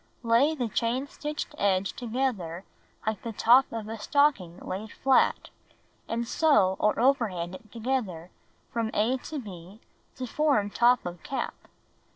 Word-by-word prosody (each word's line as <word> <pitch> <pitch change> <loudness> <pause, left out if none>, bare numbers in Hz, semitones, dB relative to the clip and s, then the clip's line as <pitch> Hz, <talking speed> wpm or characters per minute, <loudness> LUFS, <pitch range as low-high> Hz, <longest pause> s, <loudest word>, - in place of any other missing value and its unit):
Lay 240 +7 +3
the 250 -5 -1
chain 235 +4 -1
stitched 300 +1 -5
edge 195 -1 +1
together 220 -8 -3 0.4
like 215 -2 -1
the 230 - -5
top 245 +5 +5
of 225 -2 -5
a 225 0 -6
stocking 210 - +2
laid 205 +3 -6
flat, 265 -1 +2 0.6
and 235 +1 -2
sew 215 - +3
or 210 - +2
overhand 220 -10 +1
it 215 +3 -12
together 220 -8 -3 0.4
from 230 -1 -1
a 230 +5 +2
to 300 +4 -7
b 195 -4 -9 0.4
to 255 - -4
form 255 -6 +1
top 245 +3 +3
of 175 -1 -6
cap. 270 - -3
230 Hz, 145 wpm, -27 LUFS, 195-260 Hz, 0.6 s, top